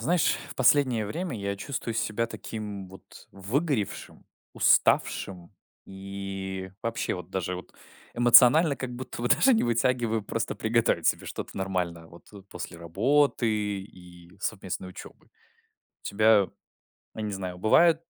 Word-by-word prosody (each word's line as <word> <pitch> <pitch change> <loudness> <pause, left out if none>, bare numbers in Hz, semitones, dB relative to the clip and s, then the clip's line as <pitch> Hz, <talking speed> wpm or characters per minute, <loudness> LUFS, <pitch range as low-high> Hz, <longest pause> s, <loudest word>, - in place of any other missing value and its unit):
Знаешь, 165 +8 +2 0.2
в - - -8
последнее 130 -3 +3
время 165 - -4
я 100 -1 -3
чувствую 115 0 -4
себя 115 +1 -1
таким 105 -4 -7
вот 95 +1 -15
выгоревшим, 115 - -3 0.3
уставшим 90 -1 +2 0.3
и 95 -1 -6
вообще, 115 0 -2
вот, 90 - -9
даже, 90 -1 -2
вот, 90 - -11 0.4
эмоционально 125 +5 +6
как 125 -2 -5
будто 125 -1 -7
бы 120 - 0
даже 200 - +5
не 225 - +2
вытягиваю 115 -1 +1
просто 115 +3 -3
приготовить 110 -7 +1
себе - - +1
что-то - - -7
нормальное 90 -3 -3
вот, 85 +5 -17
э, 100 -2 -12
после 85 - -7
работы 120 - +1 0.3
и 90 -3 -15
совместной 95 -3 -4
учёбы. 90 - -12
У - - -34 0.6
тебя, 105 -1 +4 0.7
я 110 - -4
не 105 - -3
знаю, 90 -2 -5
бывает 160 - +4
105 Hz, 135 wpm, -27 LUFS, 95-125 Hz, 0.7 s, эмоционально